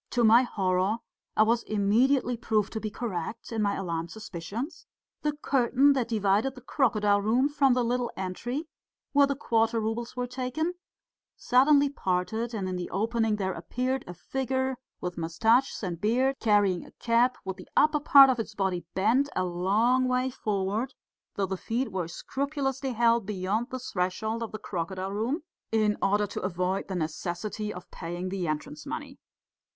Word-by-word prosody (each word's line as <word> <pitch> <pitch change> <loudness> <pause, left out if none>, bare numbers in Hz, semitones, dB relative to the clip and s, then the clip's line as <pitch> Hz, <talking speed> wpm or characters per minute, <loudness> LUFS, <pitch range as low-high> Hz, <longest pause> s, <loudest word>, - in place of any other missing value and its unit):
To 245 - +1
my 230 +2 +7
horror 195 -3 0 0.4
I 215 - +7
was 230 +2 +2
immediately 240 +5 +2
proved 215 -3 0
to 220 - -2
be 215 - -3
correct 215 -1 -5
in 225 -1 -1
my 200 -1 +1
alarmed 170 -3 -3
suspicions: 215 - -6 0.3
the 300 0 0
curtain 270 +2 +4
that 255 -4 0
divided 215 +3 +1
the 250 - -11
crocodile 215 -6 +2
room 235 +6 +3
from 280 -3 +3
the 250 - +2
little 240 0 0
entry 240 - -4 0.4
where 285 -1 +5
the 280 - -1
quarter 225 -3 +1
roubles 225 +2 -3
were 250 0 -1
taken 255 +7 -2 0.6
suddenly 280 +3 +4
parted, 220 -1 -1
and 205 -5 -3
in 185 -1 -2
the 180 - -4
opening 225 +2 0
there 190 -2 -2
appeared 250 +10 -2
a 175 - -7
figure 260 +6 -2 0.3
with 180 -1 -4
moustaches 225 +11 +2
and 175 -3 -4
beard, 255 +5 +2
carrying 205 -5 +3
a - - -14
cap, 240 +2 +2
with 190 0 -4
the 185 - -12
upper 305 0 +5
part 275 -2 +8
of 245 - -2
its 220 -1 -4
body 190 -3 -1
bent 235 +9 +3
a 185 - +1
long 205 +9 +2
way 255 +1 +1
forward, 210 +2 -2 0.4
though 200 - +1
the 190 0 -3
feet 235 +4 -2
were 185 -3 -2
scrupulously 270 - -3
held 230 -2 +3
beyond 210 +4 -1
the 260 - -4
threshold 220 0 -2
of 230 - -4
the 215 - -5
crocodile 190 -1 -4
room 240 - -1 0.3
in 215 -2 +2
order 205 +1 +2
to 205 - -5
avoid 185 +1 -1
the 190 - -4
necessity 175 +6 -3
of 180 -2 -10
paying 175 +2 -5
the 185 -2 -2
entrance 150 -1 -4
money. - - -6
220 Hz, 170 wpm, -28 LUFS, 190-255 Hz, 0.6 s, part